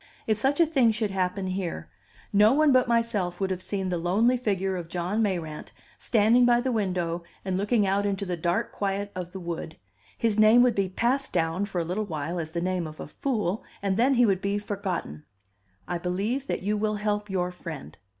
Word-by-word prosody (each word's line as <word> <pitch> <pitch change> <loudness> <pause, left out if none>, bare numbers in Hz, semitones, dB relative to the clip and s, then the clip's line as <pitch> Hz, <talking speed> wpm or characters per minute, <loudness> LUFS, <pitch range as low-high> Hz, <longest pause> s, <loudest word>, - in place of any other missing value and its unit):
If 215 -1 +1
such 270 +6 +1
a 335 - +7
thing 270 -7 +3
should 215 -2 -1
happen 190 0 -1
here, 185 - -3 0.5
no 210 +3 +6
one 305 +1 +4
but 255 -1 +4
myself 225 -7 0
would 190 -1 -1
have 185 -1 -2
seen 190 -1 -3
the 175 -1 -1
lonely 210 +9 +3
figure 195 -6 -1
of 170 -2 -6
John 180 +5 -1
Mayrant, 170 -7 -2 0.3
standing 230 +2 +4
by 240 0 +5
the 260 +1 -1
window 180 -6 -1 0.2
and 190 -1 -1
looking 205 +2 +2
out 195 +1 +1
into 200 0 -2
the 180 -1 -2
dark 170 +1 -1
quiet 200 0 -2
of 180 -1 -6
the 190 - -7
wood; 170 -2 -5 0.4
his 220 -2 +1
name 220 +3 +7
would 250 -1 +4
be 195 -3 0
passed 255 +8 0
down 165 +3 0
for 195 -3 -3
a 170 - -1
little 200 +5 -2
while 160 +1 -3
as 160 -1 -4
the 170 - -1
name 180 -2 -1
of 155 0 -11
a - - -5
fool, 215 - -2 0.2
and 195 -1 +1
then 255 +5 +3
he 245 0 +5
would 195 -3 +1
be 200 0 0
forgotten. 190 - -4 0.6
"I 175 -1 -2
believe 205 +10 -2
that - - -2
you 210 +2 +1
will 215 0 0
help 210 0 -2
your 180 -2 -1
friend." 165 -5 -8
195 Hz, 210 wpm, -26 LUFS, 180-220 Hz, 0.6 s, a